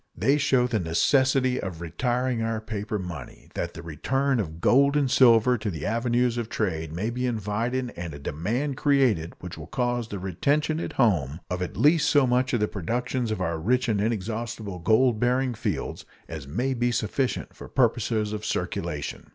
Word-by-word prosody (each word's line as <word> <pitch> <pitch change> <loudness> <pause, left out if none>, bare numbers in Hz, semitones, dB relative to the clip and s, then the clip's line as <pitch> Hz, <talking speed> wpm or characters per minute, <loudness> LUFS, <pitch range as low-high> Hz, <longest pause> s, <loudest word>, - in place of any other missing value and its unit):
They 140 +2 +3
show 130 -3 +3
the 120 -3 0
necessity 130 - +2
of 90 -4 -5
retiring 120 - -1
our 115 0 -1
paper 105 -1 -4
money, 90 -3 -8
that - - -4
the 85 - -8
return 130 - 0
of 80 -5 -4
gold 140 - +4
and 140 -3 +1
silver 120 -1 +5
to 105 0 -2
the 80 -6 -5
avenues 120 +1 +1
of 115 -2 -4
trade 80 -7 -2
may 100 +8 -2
be 125 +1 -1
invited 120 +3 -2
and 85 -1 -5
a 70 - -8
demand 115 - -2
created 130 - +2
which 90 -1 -7
will - - -8
cause 120 -2 -1
the 100 - -5
retention 140 - 0
at - - -4
home 85 - +1
of 90 0 -2
at 90 - -4
least 150 0 +4
so 145 -2 +5
much 125 +2 +1
of 120 -5 +1
the 105 - +2
productions 120 +6 -2
of 110 -3 -2
our 85 -2 -1
rich 125 +9 +1
and 105 -3 +1
inexhaustible 110 -2 -3
gold 110 +5 +3
bearing 125 +1 +1
fields 110 - -3 0.2
as 75 -4 -7
may 125 - -1
be 120 0 +1
sufficient 120 +3 -1
for - - -10
purposes 115 -4 +1
of 105 0 -4
circulation. - - -3
115 Hz, 185 wpm, -26 LUFS, 95-130 Hz, 0.2 s, silver